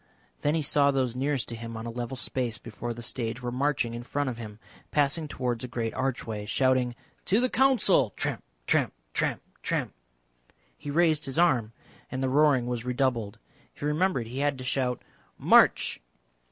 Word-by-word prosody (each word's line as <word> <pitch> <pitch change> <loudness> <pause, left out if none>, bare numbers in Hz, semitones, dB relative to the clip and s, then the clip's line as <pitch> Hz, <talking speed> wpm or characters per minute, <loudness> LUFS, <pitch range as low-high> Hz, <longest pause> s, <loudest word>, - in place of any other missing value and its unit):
Then 145 +2 +1
he 160 - 0
saw 140 0 +4
those 130 -3 0
nearest 135 0 0
to 115 - -3
him 115 0 -7
on 110 - -6
a 115 - -4
level 120 +2 -4
space 125 -4 -2
before 115 +3 -6
the 120 0 -6
stage 115 -1 -3
were 120 - -2
marching 125 -2 0
in 120 - -5
front 140 +2 -2
of 120 - -8
him, 105 -2 -8 0.3
passing 150 +2 +1
towards 125 -4 -2
a - - -3
great 115 -2 -3
archway, 115 -5 -3
shouting 130 +1 +2 0.3
"To 205 - +3
the 255 +1 +1
Council!" 245 - +4
Tramp, - - -2 0.2
tramp, - - +2 0.2
tramp, - - 0 0.2
tramp. - - -1 0.8
He 145 - -8
raised 155 -1 +2
his 135 - -3
arm, 130 -11 +3 0.4
and 130 +1 -3
the 130 - +1
roaring 140 -2 +4
was 120 -2 -3
redoubled. 125 -4 0 0.4
He - - -6
remembered 150 -4 +1
he 125 +4 -6
had 145 -1 +1
to 130 - -7
shout 125 -1 -1 0.3
"March!" - - +5
130 Hz, 180 wpm, -28 LUFS, 120-145 Hz, 0.8 s, March